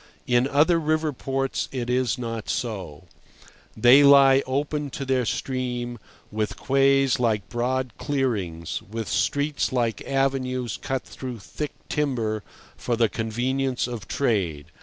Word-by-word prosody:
In 125 +1 +3
other 155 +5 +3
river 155 -1 0
ports 135 +1 -2
it 125 -3 -3
is 125 -1 +1
not 115 -3 -5
so. 95 -10 -4 0.7
They 125 +5 +7
lie 140 -1 +7
open 145 +2 -1
to 135 - -5
their 130 -2 +1
stream, 125 -2 -3 0.3
with 105 0 -2
quays 135 -1 +3
like 110 -7 +1
broad 125 +2 -1
clearings, 105 - -2
with 110 +1 -6
streets 145 +1 0
like 120 -3 0
avenues 130 -3 0
cut 135 -2 -2
through 130 -3 -7
thick 145 +8 -6
timber 115 -8 -1 0.3
for 120 - -2
the 115 -1 +2
convenience 125 +4 -1
of 120 -5 -6
trade. 85 - -1
125 Hz, 130 wpm, -25 LUFS, 115-135 Hz, 0.7 s, They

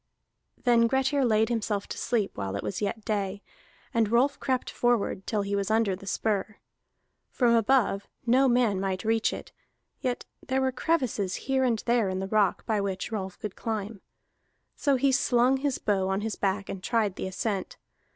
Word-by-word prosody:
Then 235 -2 +5
Grettir 270 +2 +1
laid 220 -2 +3
himself 215 -3 -1
to - - -5
sleep 220 -5 0
while 100 -1 -3
it 100 - -3
was 190 - -3
yet 210 +1 -3
day, 200 -2 -2 0.5
and 225 -2 +2
Rolf 265 +4 +3
crept 260 -1 -1
forward 235 -5 0
till 210 -2 0
he 200 0 -2
was 200 0 -1
under 220 -3 +2
the 195 +1 -13
spur. 210 0 -1 0.7
From 240 -3 +2
above 230 -3 +2 0.2
no 255 +3 +4
man 240 -6 +3
might 190 -1 -2
reach 225 0 +2
it; - - -7 0.5
yet 250 -1 -2 0.2
there 265 +1 0
were 265 0 +1
crevices 250 - 0
here 265 0 +2
and 235 -4 +1
there 235 -4 +2
in 185 - -2
the 190 - -2
rock 205 -1 +1
by 215 -2 +1
which 195 0 -3
Rolf 190 -4 -4
could 210 -3 -6
climb. 215 -2 -4 0.7
So 280 -2 +2
he 270 +1 +3
slung 250 0 +3
his 275 -1 -1
bow 190 -2 0
on 195 +1 0
his 220 0 -2
back 195 0 -1
and 190 - -6
tried 215 -2 0
the - - -4
ascent. 195 +1 -3
220 Hz, 180 wpm, -27 LUFS, 200-245 Hz, 0.7 s, Then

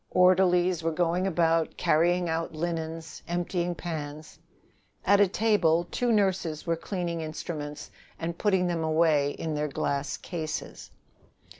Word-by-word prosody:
Orderlies 180 -1 +4
were 165 - 0
going 175 +3 +1
about, 165 -2 +1
carrying 175 +3 +2
out 165 0 -2
linens, 160 0 -4
emptying 175 0 -1
pans. 155 -3 -6 0.7
At 200 +1 +5
a 205 - +6
table 180 -5 +2
two 245 -1 0
nurses 190 -7 +1
were 170 -1 +1
cleaning 170 -1 -3
instruments 155 -1 -6 0.3
and 170 +1 -3
putting 190 -1 +2
them 170 -2 -1
away 155 -2 +3
in 160 -1 -4
their 150 0 -1
glass 140 0 -2
cases. 160 -4 -5
170 Hz, 130 wpm, -28 LUFS, 160-180 Hz, 0.7 s, a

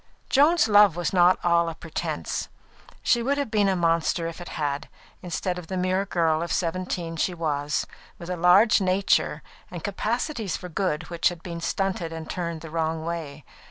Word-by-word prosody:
Joan's 295 -1 +5
love 205 -4 +6
was 175 0 -2
not 180 0 +5
all 170 -1 +3
a 165 - -7
pretence. 165 -1 -4 0.5
She 240 - +3
would 275 +4 0
have 280 -6 -2
been 205 -3 +3
a 190 - +2
monster 165 -1 +1
if 165 +1 -6
it 175 - -8
had 145 -1 -1
been, - - -14 0.3
instead 180 +1 -3
of 170 - -11
the 185 - -3
mere 185 +2 0
girl 165 -4 +1
of 170 - -3
seventeen 175 -1 -2
she 180 +3 0
was, 150 -2 -1 0.3
with 170 - -9
a - - -1
large 180 +6 +5
nature, 185 -5 +1 0.3
and 175 -3 -8
capacities 220 - -2
for 180 - -8
good 175 -2 -2
which 170 -1 +2
had 175 -2 -10
been 170 -2 -6
stunted 190 -2 -1
and 160 -1 -7
turned 170 -3 -4
the 160 -1 -9
wrong 160 0 -1
way. 155 -5 -5
175 Hz, 190 wpm, -25 LUFS, 165-190 Hz, 0.5 s, love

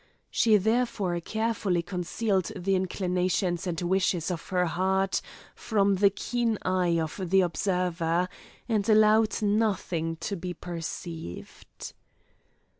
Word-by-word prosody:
She 220 -2 +4
therefore 210 -4 0
carefully 215 -2 -1
concealed 185 +2 -1
the 195 +2 -1
inclinations 185 -1 0
and 170 -2 -2
wishes 180 -1 +1
of 170 -2 -5
her 180 -2 +2
heart 190 +3 0 0.3
from 200 -3 +1
the 200 +1 +5
keen 230 +2 -1
eye 180 -2 +1
of 160 +4 -4
the 190 +1 +5
observer, 180 -1 0 0.4
and 215 -3 0
allowed 215 +1 +4
nothing 200 -6 0
to 200 +5 -4
be 180 0 -5
perceived. 165 - -7
185 Hz, 115 wpm, -27 LUFS, 175-210 Hz, 0.4 s, the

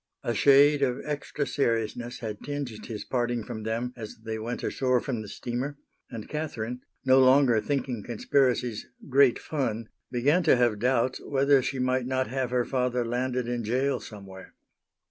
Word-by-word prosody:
A 120 - -1
shade 140 +5 +5
of 130 -2 +1
extra 145 0 -3
seriousness 120 -2 -1
had 105 -3 -5
tinged 145 -2 -4 0.2
his 105 -2 -6
parting 120 -2 -1
from 110 -1 -6
them 115 +3 -2
as 110 -3 -8
they 110 0 -3
went 120 +3 -4
ashore 130 -2 +1
from 120 -3 -3
the 105 - -8
steamer, 125 +7 -4 0.3
and 115 -4 -7
Catherine, 125 -6 -4 0.2
no 130 0 +6
longer 130 -3 +5
thinking 130 -4 -2
conspiracies 125 0 0 0.2
"great 135 -2 +5
fun," 115 -7 -3 0.2
began 140 +8 +2
to 160 -5 +5
have 120 -4 +2
doubts 125 +1 +1
whether 140 0 +3
she 135 +2 -3
might 130 0 0
not 130 0 0
have 130 -1 -2
her 125 -1 +1
father 125 -2 0
landed 125 +1 -1
in 120 -1 -2
jail 130 +4 0
somewhere. 95 -3 -11
125 Hz, 165 wpm, -27 LUFS, 115-135 Hz, 0.3 s, no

